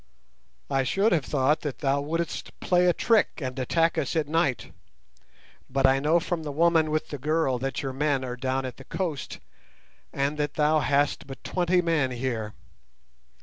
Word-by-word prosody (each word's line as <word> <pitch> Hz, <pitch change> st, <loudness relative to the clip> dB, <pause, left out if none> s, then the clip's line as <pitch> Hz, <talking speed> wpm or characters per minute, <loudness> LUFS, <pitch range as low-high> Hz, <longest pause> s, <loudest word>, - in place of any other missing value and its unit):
"I 135 Hz, -1 st, +1 dB
should 195 Hz, -, +1 dB
have 160 Hz, -6 st, +1 dB
thought 145 Hz, +2 st, +2 dB
that 145 Hz, -4 st, -4 dB
thou 140 Hz, -1 st, 0 dB
wouldst 165 Hz, +3 st, -4 dB
play 180 Hz, -1 st, +3 dB
a -, -, +6 dB
trick 225 Hz, +4 st, +2 dB
and 130 Hz, -2 st, -4 dB
attack 165 Hz, +6 st, +1 dB
us -, -, -2 dB
at 155 Hz, -3 st, +1 dB
night, 150 Hz, -4 st, 0 dB, 1.0 s
but 135 Hz, +1 st, +1 dB
I 135 Hz, 0 st, +5 dB
know 155 Hz, +5 st, +3 dB
from 170 Hz, 0 st, -3 dB
the 150 Hz, -2 st, -5 dB
woman 160 Hz, +1 st, +3 dB
with 155 Hz, 0 st, -1 dB
the 145 Hz, -, -5 dB
girl 150 Hz, -3 st, 0 dB
that 135 Hz, +3 st, -3 dB
your 135 Hz, -1 st, -3 dB
men 140 Hz, -1 st, 0 dB
are 125 Hz, -1 st, -4 dB
down 130 Hz, +1 st, -2 dB
at 125 Hz, -, -6 dB
the 135 Hz, -, -11 dB
coast, 165 Hz, -8 st, -4 dB, 0.7 s
and 140 Hz, +2 st, -1 dB
that 145 Hz, -1 st, -1 dB
thou 155 Hz, +1 st, +3 dB
hast 140 Hz, +1 st, +1 dB
but 135 Hz, -1 st, -10 dB
twenty 180 Hz, 0 st, +1 dB
men 160 Hz, -6 st, +1 dB
here. 120 Hz, -4 st, -3 dB
145 Hz, 180 wpm, -26 LUFS, 135-165 Hz, 1.0 s, a